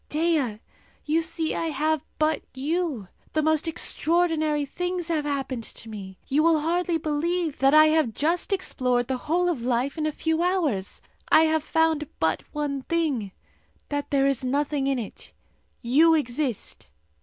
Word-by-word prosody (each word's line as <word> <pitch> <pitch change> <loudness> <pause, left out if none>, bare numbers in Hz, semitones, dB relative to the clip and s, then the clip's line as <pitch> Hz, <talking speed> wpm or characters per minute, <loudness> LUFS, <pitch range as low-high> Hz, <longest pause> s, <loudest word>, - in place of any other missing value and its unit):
Dea! 300 -9 0 0.5
you 315 +2 +2
see 320 0 -2
I 330 - -2
have 310 0 0
but 310 0 +1
you! 290 - -2 0.3
The 310 - +1
most 315 +1 +2
extraordinary 315 -2 +1
things 355 +3 -3
have 310 -3 0
happened 270 -4 -2
to 225 - -10
me. 195 -3 -8
You 285 +3 +2
will 320 -1 +4
hardly 340 +1 0
believe 320 +1 -1
that 270 +2 +4
I 310 0 +9
have 310 -8 +1
just 335 +7 0
explored 250 -10 0
the 260 - -1
whole 355 +2 +2
of 330 -9 -1
life 250 +5 -1
in 310 - 0
a - - 0
few 320 +2 -1
hours! 320 - -1 0.3
I - - +7
have 315 -1 +2
found 320 -2 +1
out 160 - +2
one 290 -2 -2
thing 275 - -1 0.6
that 290 -1 -3
there 275 -1 +2
is 275 -2 +1
nothing 280 +1 0
in 275 -1 +1
it! 230 -4 -8 0.5
You 310 +7 +5
exist! 255 - -2
305 Hz, 160 wpm, -25 LUFS, 270-325 Hz, 0.6 s, I